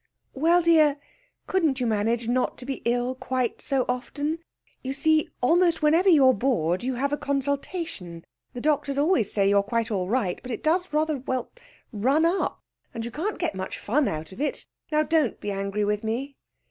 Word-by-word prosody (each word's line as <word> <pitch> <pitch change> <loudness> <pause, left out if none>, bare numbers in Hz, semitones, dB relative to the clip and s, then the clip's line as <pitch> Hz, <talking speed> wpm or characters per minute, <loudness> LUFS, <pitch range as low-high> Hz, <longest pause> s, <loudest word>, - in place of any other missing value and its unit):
'Well, 335 +5 +3
dear, 310 -4 +5 0.5
couldn't 320 -8 +1
you 250 - 0
manage 225 +1 0
not 250 +1 0
to 250 - -9
be 270 0 -4
ill 245 +1 +1
quite 255 -2 -2
so 270 -3 0
often? 290 +5 -2 0.4
You 265 +1 -3
see, 310 +2 +2
almost 335 +5 +3
whenever 330 +6 +4
you're 275 -6 +6
bored 190 -7 0
you 255 0 -1
have 280 +3 -1
a - - +1
consultation. 280 - -3 0.3
The 245 - -5
doctors 290 -1 0
always 285 - +2
say 200 -2 +2
you're 200 0 +4
quite 230 +2 -2
all 185 -3 -1
right; 220 -7 0
but 250 - -9
it 235 - -4
does 350 +3 +1
rather 305 0 +1
well, 260 -1 -3 0.4
run 265 +10 +2
up, 350 +4 0 0.3
and 230 0 -4
you 235 - -5
can't 375 - -3
get 350 - -1
much 190 0 -5
fun 275 +6 +1
out 155 +2 -4
of 190 - -8
it. 295 - -2 0.3
Now, 305 0 +3
don't 310 -6 +1
be 205 - -4
angry 200 +1 -2
with 210 +1 -1
me.' 255 +6 -3
260 Hz, 185 wpm, -25 LUFS, 225-305 Hz, 0.5 s, you're